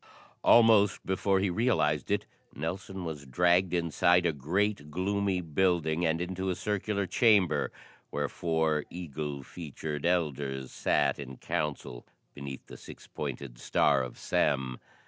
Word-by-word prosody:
Almost 110 -4 +5
before 95 +1 +1
he 95 -1 +1
realized 85 - +1
it, - - 0 0.3
Nelson 90 +4 -4
was 75 -3 -5
dragged 90 +6 +3
inside 85 +1 +3
a 85 - +2
great 80 +3 -1
gloomy 95 +3 0
building 85 0 +1
and 80 +1 0
into 95 +2 -3
a 90 - 0
circular 100 +1 -1
chamber 100 -1 +3 0.4
where 75 0 -1
four 80 -1 0
eagle 75 -5 -5
featured 75 -1 -6
elders 70 -6 -1
sat - - +1
in 65 -2 -7
council 70 -5 -4 0.3
beneath 70 -1 -8
the - - -11
six - - -12
pointed - - -6
star 65 - +3
of 65 -1 -6
Sem. 65 -4 0
85 Hz, 130 wpm, -29 LUFS, 75-95 Hz, 0.4 s, Almost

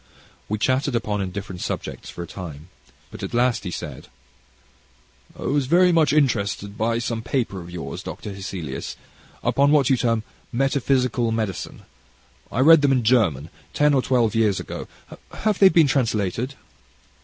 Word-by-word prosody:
We 105 - 0
chatted 130 +3 +1
upon 105 -3 -1
indifferent 95 -1 -5
subjects - - -5
for 85 - -6
a - - -6
time 85 -3 -9 0.4
but - - -9
at - - -4
last 120 -2 +1
he - - -2
said: - - -7 1.3
"I - - -8
was 140 -1 0
very 180 +4 +5
much 165 -3 +3
interested 100 -8 0
by 115 +2 0
some 115 -1 -2
papers 115 -5 -2
of 85 - -10
yours, 90 -1 -6
Dr. 105 - -7
Hesselius, 90 -8 -6 0.5
upon 140 +1 +3
what 145 -3 +4
you 130 - +4
term 115 -2 +1 0.3
Metaphysical 125 -2 +1
Medicine 110 -5 -3 0.7
I 125 - 0
read 160 +2 +8
them 140 -1 +3
in 130 -3 +2
German, 95 - +2 0.2
ten 150 0 +4
or 135 - +3
twelve 120 -5 +1
years 110 -3 +2
ago - - -6 0.5
have 215 -3 -1
they 195 - +8
been 165 -4 +5
translated?" 120 -2 0
115 Hz, 155 wpm, -23 LUFS, 100-135 Hz, 1.3 s, read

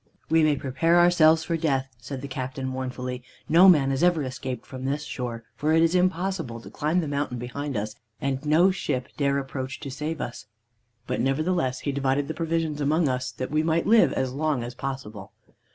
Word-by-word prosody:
"'We 165 0 +5
may 150 -1 +3
prepare 140 +6 +1
ourselves 165 -2 +5
for 165 +1 -1
death,' 140 -5 0
said 130 +2 -7
the - - -4
captain 130 0 -4
mournfully. 125 -1 -4 0.3
'No 175 +4 +7
man 140 -6 +5
has 135 +2 -1
ever 175 -3 +3
escaped 130 -1 -5
from 130 0 -7
this 145 +2 -1
shore, 120 -3 -5
for 155 +2 +1
it 165 0 +5
is 165 +1 +3
impossible 180 -8 0
to - - -12
climb 155 +5 0
the 160 - -3
mountain 140 -3 -2
behind 130 +2 -4
us, 105 +1 -3 0.3
and 135 +1 -2
no 160 +5 +4
ship 130 -8 -3
dare 140 -1 +1
approach 130 -1 -4
to 140 - -6
save 155 +4 -4
us.' 105 -3 -6 0.6
"But 125 - -2
nevertheless 135 0 0
he 145 - -1
divided 140 0 0
the 160 - -3
provisions 165 -2 -1
among 155 +3 +2
us, 130 -1 -1
that 130 - -5
we 155 0 +2
might 160 +1 +1
live 225 +1 +5
as 130 -1 -1
long 145 -3 0
as 120 +1 -6
possible. 125 -7 -6
140 Hz, 200 wpm, -25 LUFS, 130-160 Hz, 0.6 s, No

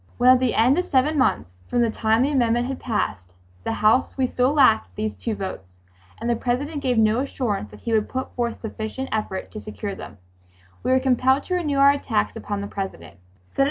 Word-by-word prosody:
When 250 +1 +6
at 255 - +5
the 255 -2 0
end 255 +8 +4
of 360 - -2
seven 285 +2 +2
months 95 - +1 0.2
from 245 - +1
the 230 -2 +2
time 220 +2 +2
the 285 - +1
amendment 240 -3 +2
had 265 +1 -4
passed 95 - -3 0.3
the - - -2
House, 240 +6 +3
we 265 - +2
still 250 +1 +1
lacked 270 -7 +3
these 215 0 -3
two 225 -2 -3
votes, 95 - -7 0.4
and 230 - -4
the 240 - +2
President 280 +6 -2
gave 250 -3 0
no 220 +1 +3
assurance 240 - -2
that 105 0 -14
he 230 - -2
would 215 -1 +1
put 260 0 -4
forth 235 -2 -3
sufficient 220 +4 -5
effort 210 -3 -3
to 215 - -7
secure 215 -1 -6
them, 100 - -10 0.6
we - - -2
were 260 0 +4
compelled 260 +1 +2
to 365 - -4
renew 310 -6 0
our 275 0 +7
attacks 105 - -1
upon 205 -1 -4
the 200 - -4
President. 85 - -7
235 Hz, 210 wpm, -23 LUFS, 210-265 Hz, 0.6 s, our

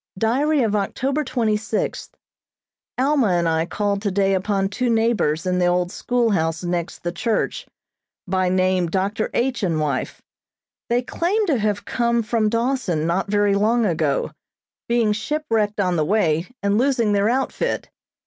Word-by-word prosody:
Diary 270 +7 +2
of 215 -2 0
October 265 +8 -1
twenty 225 -6 0
sixth: 215 +1 -3 0.8
Alma 270 -1 +2
and 170 -1 +1
I 160 0 +1
called 200 +1 -1
today 195 -1 +1
upon 195 0 0
two 245 +5 -1
neighbors 225 -9 +1
in 180 0 0
the 180 - +3
old 175 0 +1
schoolhouse 195 -11 0
next 175 -1 -3
the 175 - -1
church, 220 +6 -2 0.6
by 185 0 +1
name 185 -1 +2
Dr. 200 +5 -1
H. 250 -2 0
and 170 -5 0
wife. 145 -4 -2 0.7
They 240 +1 +1
claim 385 - 0
to 295 - +1
have 210 -1 -1
come 235 -1 0
from 215 -1 +1
Dawson 230 - 0
not 175 +4 -1
very 205 -1 +2
long 220 +4 +2
ago, 155 -6 0 0.6
being 235 -3 +2
shipwrecked 220 -4 -1
on 180 -3 +1
the 155 - +1
way, 170 -4 +1 0.2
and 200 +2 +2
losing 245 -5 +2
their 200 +1 +2
outfit. 265 +2 -1
205 Hz, 150 wpm, -22 LUFS, 180-235 Hz, 0.8 s, the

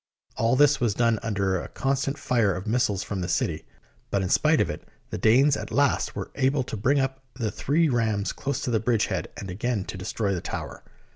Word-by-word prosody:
All 115 +3 +2
this 145 0 +4
was 115 -5 +1
done 115 -2 +2
under 100 -4 0
a - - -7
constant 135 +1 -1
fire 115 -9 +1
of 95 - -6
missiles 110 -3 +1
from 100 -2 -4
the 90 - -2
city, 85 -2 -1 0.4
but 100 -1 0
in 90 - -2
spite - - +3
of - - +3
it - - -7 0.2
the - - -3
Danes 130 +8 +5
at - - -5
last 140 -1 +1
were - - -5
able 135 0 +1
to 125 - -6
bring 130 +7 +2
up 135 0 -2
the 115 -5 -2
three 160 +4 +1
rams 110 -6 0
close 140 0 -3
to 125 - -2
the 110 - +2
bridge 110 -1 +1
head - - -2
and 95 -2 -6
again 105 +1 -2
to - - -6
destroy 100 +1 -1
the 90 - -3
tower. - - -6
115 Hz, 220 wpm, -26 LUFS, 100-135 Hz, 0.4 s, Danes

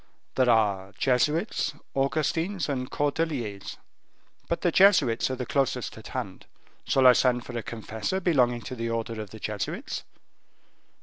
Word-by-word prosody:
"There 130 -2 +3
are 100 -4 +2
Jesuits, 150 - +1 0.2
Augustines, 160 +6 0
and 130 -3 -2
Cordeliers; 145 -9 -2 0.7
but 170 0 -1
the 175 - +2
Jesuits 155 - +4
are 130 - -2
the 125 0 -4
closest 140 0 -1
at - - -11
hand. - - -6 0.4
Shall 135 -1 +3
I 125 - +10
send 125 -1 +2
for 120 - -8
a 120 - -1
confessor 110 - -4
belonging 125 -10 +2
to 120 +4 -6
the 115 -1 -3
order 115 -1 -3
of 105 - -8
Jesuits?" 105 -2 -4
125 Hz, 140 wpm, -27 LUFS, 115-150 Hz, 0.7 s, I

